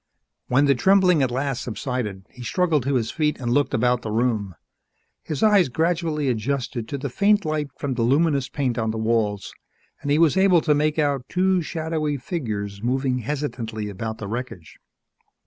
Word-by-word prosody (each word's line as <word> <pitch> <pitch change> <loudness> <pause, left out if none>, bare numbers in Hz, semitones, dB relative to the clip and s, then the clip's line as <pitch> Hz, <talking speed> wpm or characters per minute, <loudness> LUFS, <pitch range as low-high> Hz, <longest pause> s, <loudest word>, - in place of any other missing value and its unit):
When 135 +3 +3
the 140 - +5
trembling 185 +3 +4
at 130 - +2
last 130 0 -2
subsided, 110 -5 -4
he 125 - -13
struggled 155 - +1
to 140 0 +1
his 115 -3 0
feet 150 -2 0
and 120 -2 -2
looked 145 +2 +2
about 125 +1 +2
the 110 - -5
room. 110 -4 0 0.7
His 150 -4 -4
eyes 205 -7 +5
gradually 160 +1 0
adjusted 120 -1 -2
to 140 - -4
the 140 - -4
faint 205 - +2
light 155 -1 -1
from 140 -2 -2
the 120 - -2
luminous 140 +2 +2
paint 130 -5 -1
on 110 -1 0
the 110 - -3
walls 110 -3 -1 0.5
and 145 - -4
he 145 - +3
was 165 +2 +4
able 190 -3 +5
to 155 - +2
make 150 +1 +1
out 140 -4 0
two 185 0 +2
shadowy 155 -3 -2
figures 105 - -4
moving 130 +2 0
hesitantly 115 -5 -4
about 110 +3 -5
the 100 - -6
wreckage. 110 -6 -6
135 Hz, 180 wpm, -23 LUFS, 115-155 Hz, 0.7 s, the